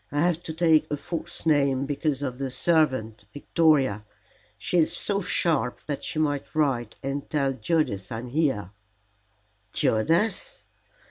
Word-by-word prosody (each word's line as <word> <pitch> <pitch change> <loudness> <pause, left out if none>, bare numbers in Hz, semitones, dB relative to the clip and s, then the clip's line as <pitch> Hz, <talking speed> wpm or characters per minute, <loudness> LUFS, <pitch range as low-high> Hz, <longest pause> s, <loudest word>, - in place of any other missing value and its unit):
I 145 +1 0
have 175 0 +1
to 160 - -3
take 160 -2 +3
a 150 - -1
false 165 +3 -5
name 140 -3 +2
because 145 0 -1
of 130 -2 -4
the 135 -1 -2
servant, 130 -9 +1
Victoria. 145 - +2 0.5
She 180 - 0
is 160 - +3
so 200 -1 -1
sharp 155 -8 +1
that 145 -2 -4
she - - -4
might 145 -2 -1
write 130 -7 0
and 135 +1 -4
tell 140 -3 +1
Judas 125 - -1
I 115 - -3
am 125 +2 -7
here." 130 - 0 1.0
"Judas!" 170 - +1
145 Hz, 145 wpm, -26 LUFS, 130-160 Hz, 1.0 s, take